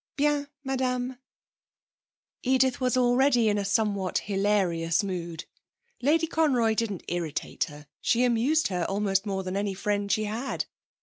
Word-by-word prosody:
'Bien, 290 Hz, -1 st, +1 dB, 0.2 s
madame.' 255 Hz, -1 st, -1 dB, 1.2 s
Edith 260 Hz, 0 st, +2 dB
was 255 Hz, 0 st, +2 dB
already 245 Hz, -1 st, +4 dB
in 205 Hz, 0 st, +1 dB
a -, -, -1 dB
somewhat 200 Hz, -2 st, 0 dB
hilarious 195 Hz, -4 st, +1 dB
mood. 175 Hz, -4 st, -4 dB, 0.6 s
Lady 310 Hz, +5 st, +3 dB
Conroy 270 Hz, -9 st, +2 dB
didn't 215 Hz, -4 st, -2 dB
irritate 165 Hz, -3 st, -2 dB
her; 150 Hz, -2 st, -12 dB, 0.2 s
she 240 Hz, +1 st, +2 dB
amused 250 Hz, +7 st, +2 dB
her 180 Hz, -2 st, -1 dB
almost 195 Hz, 0 st, 0 dB
more 190 Hz, -1 st, -2 dB
than 185 Hz, 0 st, -4 dB
any 200 Hz, -1 st, -1 dB
friend 205 Hz, +1 st, -1 dB
she 215 Hz, -, +2 dB
had. 225 Hz, +6 st, -3 dB
215 Hz, 135 wpm, -27 LUFS, 195-255 Hz, 1.2 s, already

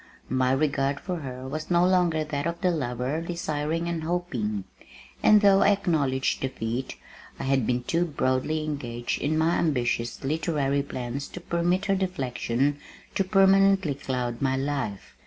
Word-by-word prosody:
My 130 Hz, 0 st, +2 dB
regard 140 Hz, 0 st, +1 dB
for 180 Hz, -2 st, -4 dB
her 130 Hz, -4 st, -6 dB
was 155 Hz, +3 st, -5 dB
no 175 Hz, 0 st, +4 dB
longer 175 Hz, -4 st, +2 dB
that 150 Hz, 0 st, -2 dB
of 170 Hz, 0 st, -4 dB
the 180 Hz, -, +3 dB
lover 130 Hz, 0 st, -2 dB
desiring 165 Hz, -1 st, -2 dB
and 170 Hz, -1 st, -2 dB
hoping, 130 Hz, -, -2 dB, 0.6 s
and 210 Hz, -1 st, +6 dB
though 200 Hz, -1 st, +6 dB
I -, -, +5 dB
acknowledged 155 Hz, -10 st, +1 dB
defeat 125 Hz, -1 st, -3 dB, 0.4 s
I -, -, -5 dB
had 135 Hz, -3 st, +1 dB
been 125 Hz, 0 st, 0 dB
too 170 Hz, +6 st, +1 dB
broadly 150 Hz, 0 st, 0 dB
engaged 120 Hz, -6 st, -3 dB
in 155 Hz, +2 st, 0 dB
my 160 Hz, +2 st, +2 dB
ambitious 120 Hz, -6 st, 0 dB
literary 145 Hz, -1 st, 0 dB
plans 130 Hz, 0 st, -5 dB
to -, -, -8 dB
permit 175 Hz, +2 st, 0 dB
her 195 Hz, -, +2 dB
deflection 140 Hz, -6 st, -1 dB, 0.3 s
to 195 Hz, -, +1 dB
permanently 195 Hz, -3 st, +4 dB
cloud 125 Hz, -3 st, -3 dB
my 130 Hz, -1 st, +1 dB
life. 135 Hz, -8 st, -3 dB
145 Hz, 155 wpm, -26 LUFS, 130-170 Hz, 0.6 s, and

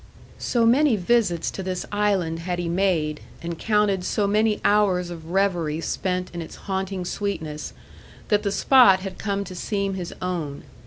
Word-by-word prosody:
So 235 Hz, -2 st, +1 dB
many 260 Hz, +2 st, +4 dB
visits 200 Hz, -3 st, +1 dB
to -, -, -6 dB
this 185 Hz, -1 st, -3 dB
island 195 Hz, -6 st, 0 dB
had 175 Hz, +1 st, -3 dB
he 175 Hz, -1 st, -2 dB
made, 170 Hz, -4 st, 0 dB, 0.2 s
and 170 Hz, -1 st, -5 dB
counted 210 Hz, -3 st, +2 dB
so 205 Hz, +3 st, 0 dB
many 210 Hz, +1 st, +2 dB
hours 190 Hz, -4 st, +3 dB
of 165 Hz, -1 st, -9 dB
revery 175 Hz, -5 st, +1 dB
spent 180 Hz, +2 st, -2 dB
in 170 Hz, -, -4 dB
its 160 Hz, -, -8 dB
haunting 190 Hz, -1 st, -2 dB
sweetness, 165 Hz, -6 st, -4 dB, 0.6 s
that 210 Hz, -1 st, +3 dB
the 200 Hz, -, -1 dB
spot 205 Hz, -5 st, +6 dB
had 190 Hz, -1 st, -7 dB
come 200 Hz, -1 st, -1 dB
to 185 Hz, -1 st, -9 dB
seem 200 Hz, +1 st, -2 dB
his 180 Hz, -2 st, -5 dB
own. 165 Hz, -6 st, -3 dB
190 Hz, 165 wpm, -24 LUFS, 175-205 Hz, 0.6 s, spot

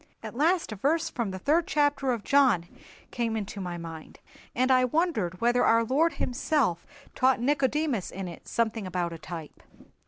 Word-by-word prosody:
At -, -, -6 dB
last 325 Hz, +4 st, +1 dB
a -, -, -4 dB
verse 320 Hz, -, 0 dB
from 235 Hz, -4 st, -2 dB
the 190 Hz, -, -5 dB
third 310 Hz, -, +1 dB
chapter 285 Hz, -2 st, +1 dB
of 235 Hz, -4 st, -2 dB
John 260 Hz, -11 st, +3 dB, 0.5 s
came 230 Hz, -2 st, -1 dB
into 205 Hz, -1 st, -5 dB
my 175 Hz, -2 st, -4 dB
mind, 165 Hz, -2 st, -9 dB, 0.4 s
and 255 Hz, +2 st, +2 dB
I 255 Hz, -1 st, +5 dB
wondered 250 Hz, -, 0 dB
whether 240 Hz, +1 st, +3 dB
our 230 Hz, 0 st, +4 dB
Lord 295 Hz, +8 st, +2 dB
Himself 245 Hz, -, -1 dB, 0.3 s
taught 260 Hz, -1 st, +3 dB
Nicodemus 275 Hz, -, 0 dB
in 190 Hz, -1 st, -6 dB
it 170 Hz, -, -10 dB
something 220 Hz, -3 st, -1 dB
about 175 Hz, -2 st, -2 dB
a 165 Hz, -, -8 dB
type. 160 Hz, -1 st, -9 dB
240 Hz, 175 wpm, -27 LUFS, 190-285 Hz, 0.5 s, I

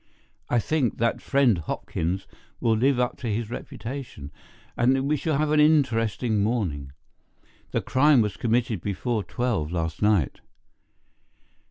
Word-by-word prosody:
I 120 Hz, -, +2 dB
think 130 Hz, 0 st, 0 dB
that 115 Hz, 0 st, 0 dB
friend 130 Hz, -9 st, +3 dB
Hopkins 85 Hz, +3 st, -3 dB, 0.3 s
will 115 Hz, -1 st, +2 dB
live 130 Hz, +3 st, +2 dB
up 125 Hz, -1 st, 0 dB
to 130 Hz, -, -5 dB
his 110 Hz, +1 st, -3 dB
reputation, 120 Hz, -, -7 dB, 0.4 s
and 125 Hz, +3 st, +3 dB
that 135 Hz, -, 0 dB
we 145 Hz, +2 st, +1 dB
shall 155 Hz, 0 st, -1 dB
have 150 Hz, 0 st, 0 dB
an 155 Hz, -, +4 dB
interesting 120 Hz, -, +2 dB
morning. 90 Hz, -, -1 dB, 0.8 s
The -, -, -1 dB
crime 140 Hz, +1 st, +4 dB
was 105 Hz, -3 st, -1 dB
committed 115 Hz, -4 st, 0 dB
before 105 Hz, +3 st, -2 dB
twelve 100 Hz, -6 st, -2 dB
last 80 Hz, -2 st, -3 dB
night." 105 Hz, -8 st, +2 dB
115 Hz, 140 wpm, -25 LUFS, 100-130 Hz, 0.8 s, an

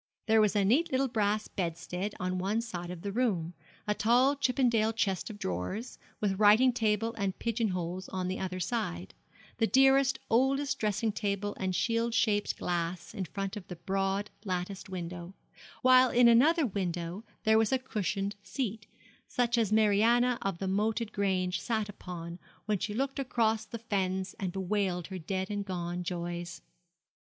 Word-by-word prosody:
There 220 Hz, -1 st, +5 dB
was 210 Hz, 0 st, +2 dB
a 200 Hz, -1 st, +3 dB
neat 275 Hz, -, +3 dB
little 265 Hz, +1 st, +2 dB
brass 215 Hz, -3 st, 0 dB
bedstead 180 Hz, +3 st, -3 dB
on 185 Hz, 0 st, -1 dB
one 205 Hz, +5 st, 0 dB
side 175 Hz, -7 st, -6 dB
of 175 Hz, -2 st, -7 dB
the 200 Hz, -, -3 dB
room, 195 Hz, -8 st, 0 dB, 0.3 s
a 210 Hz, -, +2 dB
tall 245 Hz, +7 st, +3 dB
Chippendale 245 Hz, -5 st, +2 dB
chest 195 Hz, -3 st, -1 dB
of 215 Hz, -, -8 dB
drawers, 140 Hz, -, -4 dB, 0.2 s
with 195 Hz, -2 st, 0 dB
writing 215 Hz, +5 st, +6 dB
table 225 Hz, -1 st, +1 dB
and 195 Hz, -2 st, -1 dB
pigeon 230 Hz, -1 st, 0 dB
holes 180 Hz, 0 st, -4 dB
on 185 Hz, -1 st, -3 dB
the 185 Hz, -, -3 dB
other 185 Hz, -1 st, -3 dB
side; 130 Hz, -, -3 dB, 0.5 s
the 225 Hz, -, +3 dB
dearest, 270 Hz, +1 st, +4 dB
oldest 270 Hz, +4 st, +2 dB
dressing 215 Hz, +1 st, 0 dB
table 205 Hz, -1 st, -2 dB
and 185 Hz, -1 st, -1 dB
shield 230 Hz, +3 st, 0 dB
shaped 205 Hz, -2 st, +1 dB
glass 170 Hz, 0 st, -3 dB
in 190 Hz, -, -3 dB
front 195 Hz, +3 st, -4 dB
of 200 Hz, -4 st, -8 dB
the 180 Hz, -, -6 dB
broad 195 Hz, +3 st, -1 dB
latticed 185 Hz, 0 st, -4 dB
window; 180 Hz, 0 st, -6 dB, 0.5 s
while 255 Hz, 0 st, +7 dB
in 240 Hz, 0 st, +5 dB
another 290 Hz, +8 st, +5 dB
window 180 Hz, -2 st, -3 dB, 0.2 s
there 220 Hz, 0 st, +5 dB
was 225 Hz, -1 st, +2 dB
a 265 Hz, -, +4 dB
cushioned 205 Hz, -5 st, -2 dB
seat, 220 Hz, -2 st, -4 dB, 0.4 s
such 245 Hz, -1 st, +1 dB
as 225 Hz, -4 st, +1 dB
Mariana 225 Hz, +3 st, +4 dB
of 195 Hz, -3 st, -2 dB
the 190 Hz, -, -3 dB
Moated 215 Hz, +3 st, 0 dB
Grange 185 Hz, -2 st, 0 dB
sat 220 Hz, -3 st, -1 dB
upon 175 Hz, -4 st, -8 dB, 0.3 s
when 210 Hz, -2 st, 0 dB
she 210 Hz, +2 st, -3 dB
looked 270 Hz, +3 st, -1 dB
across 225 Hz, -4 st, +1 dB
the 230 Hz, -, -6 dB
fens 190 Hz, -4 st, -2 dB
and 190 Hz, -2 st, -2 dB
bewailed 190 Hz, -2 st, -1 dB
her 190 Hz, -1 st, -5 dB
dead 190 Hz, +3 st, -3 dB
and 205 Hz, -1 st, -2 dB
gone 175 Hz, -2 st, -4 dB
joys. 175 Hz, 0 st, -5 dB
205 Hz, 165 wpm, -30 LUFS, 185-230 Hz, 0.5 s, while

